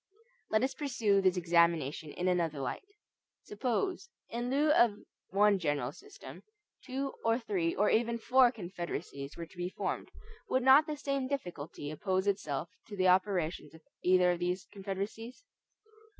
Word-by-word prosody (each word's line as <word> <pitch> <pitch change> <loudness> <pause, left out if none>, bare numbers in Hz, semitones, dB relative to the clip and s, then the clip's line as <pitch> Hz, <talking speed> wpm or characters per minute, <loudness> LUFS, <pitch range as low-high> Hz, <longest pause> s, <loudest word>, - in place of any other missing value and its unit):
Let 215 +2 +2
us 265 - 0
pursue 225 -9 +1
this 185 -1 +3
examination 170 -4 +2
in 180 - -2
another 170 -5 +1
light. 130 -2 -3 0.6
Suppose, 255 - -2 0.2
in 240 +1 -3
lieu 295 +3 +3
of 235 -8 +5 0.3
one 200 0 +4
general 145 -6 -1
system, 415 - -12 0.4
two, 270 +1 -3
or 230 0 +3
three, 195 -9 -1
or 210 - +2
even 235 +1 +2
four 250 +1 +4
Confederacies 175 - -6
were 170 - -5
to 170 - -20
be 175 0 -2
formed, - - -4 0.4
would 260 -1 +1
not 270 +4 +7
the 305 -1 -3
same 275 -2 -2
difficulty 170 - -5
oppose 185 +4 -1
itself 175 -6 -1 0.2
to 205 - -8
the 185 0 +4
operations 180 -5 +1
of 160 - -15 0.2
either 180 0 +4
of 175 - -2
these 180 +1 -2
Confederacies? 205 - -6
195 Hz, 150 wpm, -32 LUFS, 170-240 Hz, 0.6 s, not